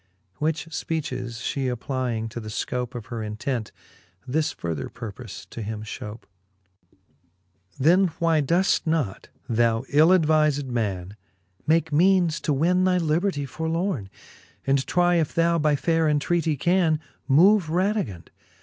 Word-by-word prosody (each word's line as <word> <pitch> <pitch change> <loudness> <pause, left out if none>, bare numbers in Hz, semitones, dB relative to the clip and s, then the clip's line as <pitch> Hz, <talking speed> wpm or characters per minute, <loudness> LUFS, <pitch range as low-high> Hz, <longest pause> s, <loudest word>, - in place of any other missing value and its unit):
Which 155 0 -1 0.2
{peaches 130 -6 -3
Ihe 135 -2 0
applying 125 -2 -2
to 115 - -6
the 110 -2 -7
fcope 125 +3 -3
Of 115 -3 -6
her 115 - -3
intent, 110 +2 -3 0.6
this 155 +4 0
further 85 - -4
purpole 110 0 -9
to 115 - -6
him 110 0 -5
fhope. 110 0 -7
XL. 95 -1 -39 0.9
Then 180 +5 +5
why 165 -2 +2
doeft 170 +5 +1
not, 155 -12 -1 0.2
thou 115 0 +1
ill 155 +4 +5
advized 155 -5 +3
man, 100 -6 -3 0.5
Make 160 0 +2
meanes 175 0 +3
to 155 - -1
win 175 +6 +2
thy 185 -1 +3
libertie 165 -2 0
forlorne, 160 - -2 0.6
And 135 -1 +1
try 175 -1 +3
if 160 -1 -1
thou, 170 0 +3
by 150 -1 +3
faire 160 +4 +1
entreatie, 150 0 +1
can 170 -2 +2 0.3
Move 180 +6 +5
Radivund 180 - -1
145 Hz, 135 wpm, -24 LUFS, 115-165 Hz, 0.9 s, Then